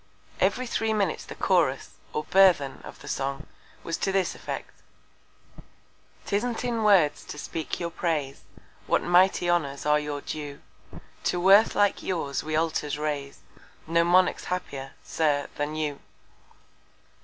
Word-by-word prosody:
Every 255 Hz, -, +1 dB
three 225 Hz, -2 st, -1 dB
Minutes 200 Hz, -6 st, -1 dB
the -, -, -9 dB
Chorus, -, -, +1 dB, 0.2 s
or 150 Hz, -, -2 dB
Burthen 180 Hz, -8 st, +4 dB
of -, -, -11 dB
the -, -, -10 dB
Song, 135 Hz, +1 st, -3 dB, 0.4 s
was 165 Hz, 0 st, -3 dB
to 195 Hz, -, -1 dB
this 190 Hz, -2 st, +1 dB
Effect. -, -, -6 dB, 1.5 s
_Tisn't 225 Hz, +4 st, -1 dB
in 235 Hz, -2 st, -1 dB
Words 190 Hz, -8 st, +4 dB
to -, -, -8 dB
speak 160 Hz, +2 st, -4 dB
your 170 Hz, -1 st, -3 dB
Praise; 150 Hz, -6 st, -2 dB, 0.5 s
What -, -, +2 dB
mighty 180 Hz, 0 st, +4 dB
Honours 145 Hz, -6 st, 0 dB
are 150 Hz, 0 st, +4 dB
your 145 Hz, -1 st, -4 dB
Due! 145 Hz, -2 st, -6 dB, 0.6 s
To 175 Hz, -, +1 dB
worth 195 Hz, +4 st, +6 dB
like 205 Hz, -1 st, +2 dB
yours 160 Hz, -7 st, -2 dB
we 155 Hz, 0 st, -2 dB
Altars 155 Hz, -2 st, 0 dB
raise, 145 Hz, -2 st, -4 dB, 0.4 s
No 170 Hz, +1 st, +3 dB
Monarch's 180 Hz, +2 st, +3 dB
happier, 135 Hz, -7 st, -4 dB
Sir, 145 Hz, -3 st, 0 dB
than 145 Hz, +1 st, -3 dB
you. 150 Hz, -2 st, -2 dB
165 Hz, 140 wpm, -26 LUFS, 145-190 Hz, 1.5 s, worth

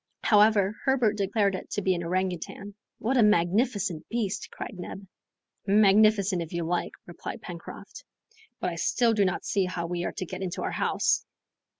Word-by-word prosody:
However, 210 Hz, -1 st, +4 dB
Herbert 250 Hz, -6 st, +2 dB
declared 200 Hz, 0 st, +1 dB
it 185 Hz, -, -6 dB
to 205 Hz, -, -3 dB
be 190 Hz, -, +3 dB
an 175 Hz, -, -3 dB
orangoutang. 185 Hz, +3 st, -3 dB, 0.2 s
"What 255 Hz, +4 st, 0 dB
a -, -, +6 dB
magnificent 205 Hz, -2 st, +1 dB
beast!" 225 Hz, -4 st, -2 dB
cried -, -, -7 dB
Neb. 195 Hz, +2 st, -7 dB, 0.6 s
"Magnificent, 205 Hz, -2 st, +4 dB
if 165 Hz, 0 st, -7 dB
you 170 Hz, 0 st, -1 dB
like," 175 Hz, +2 st, -1 dB
replied 175 Hz, -1 st, -8 dB
Pencroft; 170 Hz, -1 st, -9 dB, 0.6 s
"but 175 Hz, -2 st, -3 dB
still 235 Hz, +5 st, +2 dB
I -, -, +1 dB
do 205 Hz, -2 st, +3 dB
not 185 Hz, -, -2 dB
see 195 Hz, -2 st, +1 dB
how 180 Hz, -2 st, -3 dB
we 175 Hz, 0 st, -3 dB
are -, -, -3 dB
to 185 Hz, -, -4 dB
get 185 Hz, +2 st, -7 dB
into 185 Hz, -2 st, -3 dB
our -, -, -2 dB
house." -, -, +1 dB
195 Hz, 175 wpm, -27 LUFS, 180-215 Hz, 0.6 s, a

